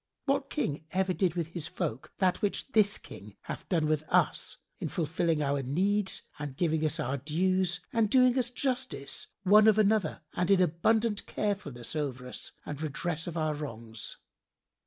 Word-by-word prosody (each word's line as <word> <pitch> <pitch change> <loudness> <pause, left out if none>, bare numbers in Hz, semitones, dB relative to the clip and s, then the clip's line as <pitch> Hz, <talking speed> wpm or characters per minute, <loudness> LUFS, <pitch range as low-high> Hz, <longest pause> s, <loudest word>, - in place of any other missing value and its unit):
What 275 0 +1
King 275 - 0
did 150 - -10
ever 190 0 +2 0.2
with 170 -2 -2
his 165 -2 -4
folk 120 +4 -4
that 185 0 +2
which 205 +5 -1
this 210 -3 +4
King 100 +2 -12
hath - - -7
done 165 -4 +2
with 155 0 +1
us - - +2 0.2
in - - -3
fulfilling 165 -1 0
our 140 0 +1
needs 190 +9 +1 0.2
and 145 -3 -5
giving 160 -2 +1
us 155 +2 0
our 140 -1 -1
dues 175 +5 +1
and 225 -3 +3
doing 255 +1 +5
us 250 -2 +2
justice, 250 - -2 0.2
one 210 +3 +7
of 215 -1 +6
other, 210 -7 +2
and 180 +1 0
in 195 -2 +6
abundant 210 +6 +2
carefulness 160 - -3
over 135 -4 -3
us 125 - -5
and 145 0 -5
redress 160 +2 -2
of 170 -1 -4
our 155 -1 +1
wrongs? 115 -7 -6
170 Hz, 170 wpm, -30 LUFS, 150-205 Hz, 0.2 s, one